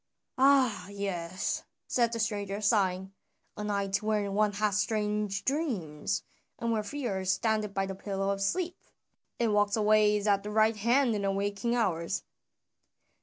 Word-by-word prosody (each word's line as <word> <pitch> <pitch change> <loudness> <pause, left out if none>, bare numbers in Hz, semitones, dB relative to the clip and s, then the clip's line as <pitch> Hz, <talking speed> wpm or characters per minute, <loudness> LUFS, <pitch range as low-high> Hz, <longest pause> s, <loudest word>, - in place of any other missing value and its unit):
"Ah, 260 -8 +4
yes!" 185 -3 -3 0.2
said 235 -2 +1
the 230 - -3
stranger 205 -3 -2
sighing, 190 -3 +1 0.4
"a 210 - -5
night 200 -2 -1
wherein 210 -2 0
one 210 0 +3
hath 210 0 0
strange 210 -1 -1
dreams, 205 - -1 0.3
and 230 0 -1
where 220 -1 +1
fear 210 -5 -3
standeth 210 +2 0
by 195 0 +1
the 195 - -4
pillow 195 0 -2
of 195 0 -3
sleep, 350 - -1 0.6
and 230 -3 +2
walks 205 +1 +2
always 210 -1 +3
at 200 -2 +3
the 210 - -6
right 215 +1 +3
hand 240 +3 +3
in 210 - -1
the 195 - 0
waking 200 +4 -1
hours." 185 -6 0
210 Hz, 150 wpm, -30 LUFS, 195-220 Hz, 0.6 s, Ah